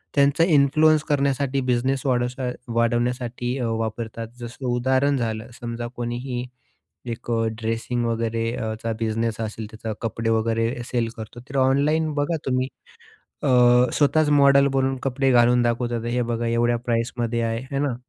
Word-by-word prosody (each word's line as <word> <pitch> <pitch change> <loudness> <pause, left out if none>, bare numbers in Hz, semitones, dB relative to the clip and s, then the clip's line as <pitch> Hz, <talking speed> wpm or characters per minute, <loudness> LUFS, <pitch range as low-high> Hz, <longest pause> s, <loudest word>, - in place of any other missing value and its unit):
त्यांचा 140 +3 +4
इन्फ्लुएन्स 155 0 +4
करण्यासाठी 140 -1 +1
बिझनेस 130 +2 +1
वाढवाचा 125 0 0 0.2
वाढवण्यासाठी 120 +2 0
अ, 120 - -1
वापरतात. 115 0 -3
जसं 120 +2 -8
उदाहरण 130 +3 +2
झालं 110 0 -3
समजा, 120 0 -4
कोणीही 120 +1 -3 0.7
एक 120 - -7
अ, 115 0 +1 0.2
ड्रेसिंग 115 +2 -1
वगैरे 115 0 -1
अ, 110 -1 -3
चा 115 0 -1
बिझनेस 115 0 -1
असेल 110 0 -4
त्याचा 110 0 -5
कपडे 115 0 -2
वगैरे 115 +1 +1 0.2
सेल 120 -2 +1
करतो, 110 +2 -9
तर 140 - -4
ऑनलाईन 150 +3 +2
बघा 145 +3 0
तुम्ही 130 0 0 0.8
अ, - - +1 0.5
स्वतःच 150 +1 +3
मॉडल 140 0 +6
बनून 135 0 +1
कपडे 135 0 +1
घालून 120 0 +5
दाखवतात. 120 -1 -1
हे 125 0 +1
बघा 115 0 -2
एवढ्या 120 +1 +2
प्राईसमध्ये 120 0 -1
आहे. 115 +1 -1
आहे 135 +1 -4
ना? 140 -4 0
120 Hz, 145 wpm, -23 LUFS, 115-135 Hz, 0.8 s, मॉडल